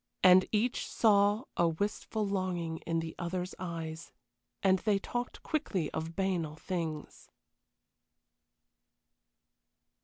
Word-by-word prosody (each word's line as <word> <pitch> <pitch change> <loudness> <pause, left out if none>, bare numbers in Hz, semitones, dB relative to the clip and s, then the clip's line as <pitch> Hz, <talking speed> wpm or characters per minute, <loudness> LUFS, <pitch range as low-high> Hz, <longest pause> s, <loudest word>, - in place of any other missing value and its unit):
And 185 0 +8
each 225 +3 +1
saw 205 0 +4
a 170 - +3
wistful 205 +5 -2
longing 185 -4 -1
in 165 0 +1
the 160 0 -5
other's 180 +1 -3
eyes, 165 -3 -5 0.5
and 190 -1 +4
they 210 0 +2
talked 240 +5 -4
quickly 195 - -1
of 160 +1 -4
banal 180 -6 -1
things. 160 -3 -5
185 Hz, 100 wpm, -32 LUFS, 165-200 Hz, 0.5 s, And